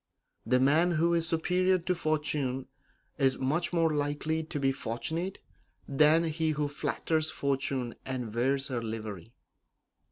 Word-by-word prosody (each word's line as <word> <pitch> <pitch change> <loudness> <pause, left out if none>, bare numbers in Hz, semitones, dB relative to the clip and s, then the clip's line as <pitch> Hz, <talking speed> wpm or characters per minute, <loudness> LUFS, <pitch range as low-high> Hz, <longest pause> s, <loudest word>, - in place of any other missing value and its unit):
The 125 +2 +4
man 160 +7 +4
who 170 +2 +2
is 165 -1 +2
superior 180 +3 +2
to 180 +1 -1
fortune 150 -5 -1 0.5
is 135 -2 +3
much 155 +6 0
more 165 -2 +2
likely 145 +2 -1
to 155 -1 -5
be 135 -1 +2
fortunate 155 +9 -3 0.5
than 150 +4 +4
he 160 0 0
who 150 -1 -1
flatters 155 +2 -1
fortune 135 -4 -1
and 125 -4 -4
wears 135 +4 0
her 125 -3 -2
livery. 110 -1 -6
145 Hz, 135 wpm, -30 LUFS, 130-165 Hz, 0.5 s, The